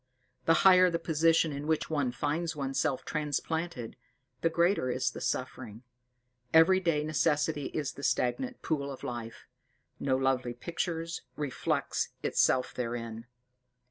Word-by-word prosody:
The 165 Hz, -, +5 dB
higher 185 Hz, -1 st, +8 dB
the 170 Hz, -, 0 dB
position 165 Hz, 0 st, +2 dB
in 145 Hz, +1 st, -5 dB
which 160 Hz, -1 st, +1 dB
one 145 Hz, -5 st, 0 dB
finds 160 Hz, +5 st, -2 dB
oneself 135 Hz, -1 st, -1 dB
transplanted, 155 Hz, -3 st, -3 dB, 0.4 s
the 165 Hz, -, +3 dB
greater 170 Hz, -4 st, +2 dB
is -, -, 0 dB
the -, -, -8 dB
suffering. 110 Hz, +3 st, -4 dB, 0.7 s
Everyday 165 Hz, -2 st, +5 dB
necessity 150 Hz, -1 st, +1 dB
is 150 Hz, -3 st, -3 dB
the -, -, -10 dB
stagnant 250 Hz, -, -1 dB
pool 140 Hz, -3 st, -1 dB
of 135 Hz, -, -9 dB
life 120 Hz, -2 st, -6 dB, 0.5 s
no 135 Hz, -2 st, +1 dB
lovely 130 Hz, -2 st, 0 dB
picture 165 Hz, +4 st, -3 dB, 0.3 s
reflects 145 Hz, -4 st, -1 dB
itself 130 Hz, -, +2 dB
therein. 115 Hz, -1 st, -4 dB
150 Hz, 125 wpm, -30 LUFS, 130-165 Hz, 0.7 s, higher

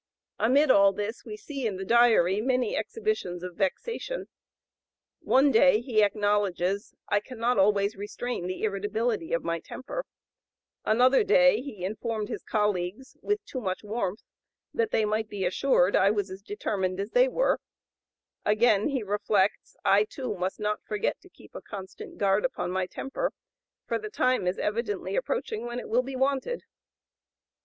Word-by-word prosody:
Amid 270 Hz, +5 st, +4 dB
all 200 Hz, -2 st, +6 dB
this 210 Hz, +3 st, -5 dB
we 215 Hz, -2 st, -7 dB
see 275 Hz, 0 st, -4 dB
in 200 Hz, -3 st, -3 dB
the 190 Hz, -, -5 dB
Diary 220 Hz, -4 st, +4 dB
many 255 Hz, -, +1 dB
exhibitions 430 Hz, -, -2 dB
of 180 Hz, -1 st, -5 dB
vexation. 465 Hz, -, -3 dB, 0.9 s
One 275 Hz, +2 st, +4 dB
day 230 Hz, -1 st, +5 dB
he 235 Hz, -3 st, +1 dB
acknowledges, 205 Hz, -2 st, 0 dB
"I 205 Hz, -, +3 dB
cannot 235 Hz, 0 st, -1 dB
always 200 Hz, +1 st, +3 dB
restrain 205 Hz, 0 st, -4 dB
the 185 Hz, +3 st, -5 dB
irritability 210 Hz, -1 st, -1 dB
of 170 Hz, -, 0 dB
my 170 Hz, 0 st, -1 dB
temper;" 390 Hz, -, -6 dB, 0.8 s
another 250 Hz, -, +4 dB
day 270 Hz, -, +5 dB
he 215 Hz, -10 st, -6 dB
informed 215 Hz, +1 st, -3 dB
his -, -, -4 dB
colleagues, 210 Hz, +4 st, -2 dB
"with 415 Hz, 0 st, -1 dB
too 260 Hz, -10 st, -5 dB
much 185 Hz, -2 st, -3 dB
warmth, 210 Hz, -2 st, -3 dB, 0.5 s
that 460 Hz, -1 st, +1 dB
they 220 Hz, -, +2 dB
might 215 Hz, +1 st, -1 dB
be 200 Hz, -3 st, -3 dB
assured 185 Hz, 0 st, +3 dB
I 195 Hz, -, +5 dB
was 200 Hz, -2 st, -1 dB
as 190 Hz, +1 st, -8 dB
determined 195 Hz, -2 st, -2 dB
as 200 Hz, +2 st, -3 dB
they -, -, +5 dB
were;" -, -, +1 dB, 0.8 s
again 215 Hz, -1 st, +3 dB
he 270 Hz, -5 st, -1 dB
reflects, 205 Hz, -1 st, 0 dB
"I, 205 Hz, +2 st, +5 dB
too, 255 Hz, 0 st, -5 dB
must 185 Hz, +3 st, -3 dB
not 210 Hz, 0 st, -2 dB
forget 210 Hz, -1 st, -2 dB
to -, -, -17 dB
keep -, -, -18 dB
a -, -, -7 dB
constant 190 Hz, -2 st, -9 dB
guard 200 Hz, 0 st, +2 dB
upon 260 Hz, -8 st, -2 dB
my 185 Hz, 0 st, -1 dB
temper, 390 Hz, -, -3 dB, 0.5 s
for -, -, -1 dB
the 430 Hz, +1 st, -6 dB
time 255 Hz, -, +1 dB
is 180 Hz, -, 0 dB
evidently 210 Hz, -1 st, -2 dB
approaching 475 Hz, -, -2 dB
when 240 Hz, +1 st, -4 dB
it -, -, -8 dB
will 235 Hz, +3 st, +3 dB
be 265 Hz, +1 st, -6 dB
wanted." 275 Hz, -, 0 dB
215 Hz, 160 wpm, -27 LUFS, 195-255 Hz, 0.9 s, all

